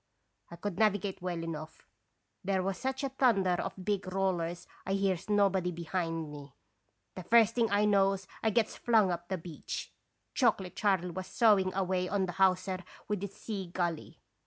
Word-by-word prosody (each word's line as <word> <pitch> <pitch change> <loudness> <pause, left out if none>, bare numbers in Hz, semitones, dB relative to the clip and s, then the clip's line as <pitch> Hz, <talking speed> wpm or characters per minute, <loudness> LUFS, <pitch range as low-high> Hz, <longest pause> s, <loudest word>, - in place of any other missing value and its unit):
I 170 - -9
could 185 +1 -5
navigate 205 -3 +1
well 175 -2 -3
enough. 160 -1 -7 0.6
There 190 -1 0
was 190 -1 -2
such 265 +1 -2
a 275 - 0
thunder 235 -8 +3
of 180 +1 -3
big 200 -3 -1
rollers 175 -3 -1 0.2
I 190 - -2
hears 195 -2 0
nobody 195 -3 +3
behind 165 -2 -3
me. 145 -3 -10 0.6
The 185 - -7
first 230 +4 +4
I 205 +1 +3
knows 195 -2 +3 0.2
I 220 - +2
gets 220 0 +1
flung 220 -6 +3
up 175 0 -4
the 190 - -1
beach. 165 -2 -7 0.4
Chocolate 195 -8 +1
Charley 190 -4 +1
was 185 +2 -5
sawing 205 -5 +4
away 185 -1 0
on 195 -1 +1
the 180 - -4
hawser 185 0 +2 0.3
with 210 -2 -2
his 200 -1 -5
sea 200 -4 -5
gully. 170 -2 -3
190 Hz, 165 wpm, -31 LUFS, 175-205 Hz, 0.6 s, first